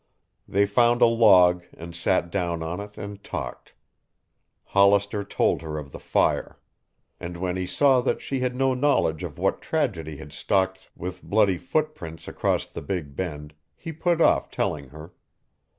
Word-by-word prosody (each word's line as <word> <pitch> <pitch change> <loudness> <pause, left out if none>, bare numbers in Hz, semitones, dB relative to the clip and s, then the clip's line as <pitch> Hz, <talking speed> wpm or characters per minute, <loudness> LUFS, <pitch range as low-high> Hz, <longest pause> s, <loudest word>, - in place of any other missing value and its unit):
They 100 +1 +2
found 120 +3 +3
a - - +9
log 95 -7 +5
and 85 +1 -9
sat 90 -2 0
down 85 -4 -1
on 85 +4 -4
it 105 0 -9
and 100 0 -8
talked. - - -6 0.9
Hollister 100 +1 +3
told 100 - 0
her 80 -1 -5
of 70 -2 -7
the - - -9
fire. - - 0 0.6
And 85 -1 -6
when 90 0 -2
he 90 -1 -3
saw 135 +3 +4
that - - 0
she 135 - -3
had 125 0 -1
no 135 0 +2
knowledge 125 - +1
of - - -6
what - - 0
tragedy 85 - -2
had 75 -2 -11
stalked 95 -1 -1
with 90 +1 -6
bloody 100 -4 +2
footprints 140 - -3
across - - 0
the - - -8
Big 75 -4 -4
Bend, 75 -4 -5 0.2
he 165 - -7
put 170 +1 0
off - - +3
telling 70 -3 -2
her. 75 +5 -12
95 Hz, 165 wpm, -25 LUFS, 85-115 Hz, 0.9 s, a